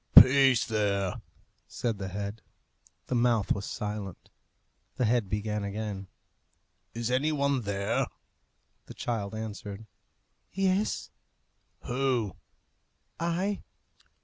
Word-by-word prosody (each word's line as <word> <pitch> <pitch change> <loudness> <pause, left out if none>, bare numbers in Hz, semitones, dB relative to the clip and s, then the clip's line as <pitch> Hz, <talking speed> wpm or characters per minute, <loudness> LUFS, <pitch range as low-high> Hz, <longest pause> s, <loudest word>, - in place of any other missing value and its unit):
"Peace 130 0 +6
there!" 100 -4 0 0.5
said 115 -4 -2
the 95 - -3
head. 100 +3 -4 0.6
The - - -3
mouth 120 -4 +3
was 100 - 0
silent. 105 -4 -5 0.6
The 125 - +1
head 115 -3 +2
began 105 0 -1
again, 100 -1 -4 0.9
"Is 115 +1 -1
any 140 +5 +2
one 140 -3 +1
there?" 100 -2 0 0.8
The - - -9
child 110 -3 -2
answered, 105 -1 -6 0.7
"Yes." 195 +2 +1 0.7
"Who?" 125 - 0 0.8
"I." 180 +4 0
110 Hz, 95 wpm, -29 LUFS, 100-130 Hz, 0.9 s, Peace